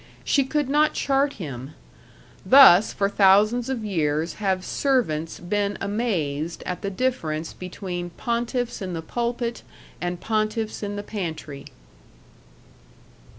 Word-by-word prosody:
She 280 - +2
could 295 +1 -1
not 300 +2 +2
chart 275 +1 +1
him.... 135 - -7 0.7
Thus 240 -8 +8
for 200 - 0
thousands 210 +5 +4
of 240 -5 -3
years 160 -4 0
have 190 -2 0
servants 165 - 0
been 200 +3 -1
amazed 170 -8 -2
at 180 - -4
the 200 - -2
difference 170 -9 -2
between 180 -1 -6
pontiffs 235 +5 -2
in 185 -2 -4
the 165 -1 -4
pulpit 235 +4 -3 0.4
and 175 0 -3
pontiffs 215 0 -2
in 205 -1 -4
the 205 - -5
pantry. 160 -9 -6
200 Hz, 120 wpm, -24 LUFS, 170-240 Hz, 0.7 s, Thus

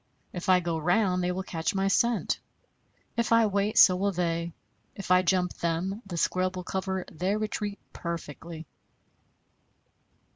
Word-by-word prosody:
If 180 +1 -4
I 185 -1 +6
go 170 -2 -2
round, 180 +2 +2
they 180 - +1
will 190 +1 -3
catch 165 +2 -2
my 195 0 +1
scent; 235 +4 +1 0.8
if 235 -1 0
I 230 -1 +6
wait, 205 +1 0
so 185 - +8
will 200 +2 0
they; 170 -1 -1 0.4
if 195 -2 -5
I 180 0 +6
jump 180 0 +1
them, 175 +5 -2
the 175 -3 -5
scrub 185 +2 0
will 180 - -5
cover 190 0 -3
their 185 +6 -1
retreat 210 -1 -3 0.2
perfectly." 165 -1 -6
185 Hz, 150 wpm, -28 LUFS, 170-200 Hz, 0.8 s, so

